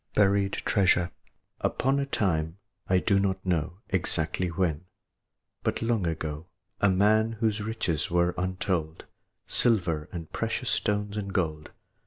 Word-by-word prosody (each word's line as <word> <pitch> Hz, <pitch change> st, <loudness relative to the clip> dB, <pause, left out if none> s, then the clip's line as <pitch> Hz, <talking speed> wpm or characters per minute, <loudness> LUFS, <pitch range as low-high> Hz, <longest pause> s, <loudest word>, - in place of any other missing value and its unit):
BURIED 100 Hz, -1 st, +3 dB
TREASURE. 90 Hz, -4 st, +2 dB, 0.5 s
Upon 135 Hz, +2 st, +1 dB
a 140 Hz, -, -1 dB
time 80 Hz, -, 0 dB, 0.3 s
I 95 Hz, -, +4 dB
do 100 Hz, +1 st, +3 dB
not 95 Hz, -1 st, -1 dB
know 90 Hz, +1 st, -1 dB
Exactly 85 Hz, -1 st, 0 dB
when, 85 Hz, -2 st, -1 dB, 0.8 s
but -, -, -1 dB
long 115 Hz, -6 st, +1 dB
ago 80 Hz, 0 st, -4 dB, 0.3 s
A 100 Hz, -, +4 dB
man 110 Hz, +4 st, +3 dB
whose 110 Hz, -1 st, 0 dB
riches 105 Hz, -8 st, -1 dB
were 85 Hz, 0 st, +2 dB
untold, 90 Hz, -3 st, -2 dB, 0.4 s
Silver 85 Hz, -10 st, +2 dB
and 85 Hz, -3 st, -7 dB
precious -, -, -1 dB
stones 105 Hz, 0 st, 0 dB
and 100 Hz, -2 st, -3 dB
gold. 80 Hz, -5 st, -1 dB
95 Hz, 130 wpm, -28 LUFS, 85-105 Hz, 0.8 s, I